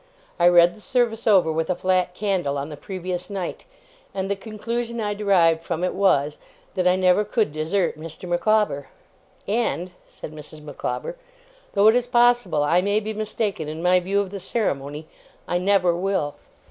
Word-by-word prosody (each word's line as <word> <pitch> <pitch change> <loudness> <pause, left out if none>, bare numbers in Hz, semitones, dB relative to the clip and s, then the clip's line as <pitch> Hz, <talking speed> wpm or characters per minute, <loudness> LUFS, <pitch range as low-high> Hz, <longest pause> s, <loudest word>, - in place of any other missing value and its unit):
I 175 - +5
read 175 0 +6
the 215 - -14
service 235 -2 0
over 185 -6 +5
with 160 +1 -1
a 180 - +1
flat 185 -1 0
candle 185 -9 -1
on 140 +2 -4
the 150 - -7
previous 180 +2 -5
night, 195 -4 -5 0.5
and 195 0 -2
the - - +1
conclusion 230 +3 -4
I 205 -2 -1
derived 180 -6 +3
from 170 0 -3
it 180 - 0
was, 150 -7 +2 0.3
that 185 -1 +1
I 180 - +4
never 185 +2 +3
could 210 -6 0
desert 160 +1 -1
Mr. 165 +3 -8
Micawber. 175 -5 +1 0.6
And,' 200 -4 -1 0.2
said - - -9
Mrs. 155 0 -11
Micawber, 485 - -5 0.6
'though 200 +1 +5
it - - +5
is 245 0 +1
possible 240 - +3
I 170 +5 +3
may 205 +2 +1
be 220 0 -5
mistaken 210 -5 -3
in 155 +2 -6
my 180 +1 +4
view 195 +3 0
of 200 -2 -2
the 200 - -5
ceremony, 150 - -2 0.4
I 175 - 0
never 180 -2 +3
will! 180 -5 -1
185 Hz, 175 wpm, -23 LUFS, 165-210 Hz, 0.6 s, read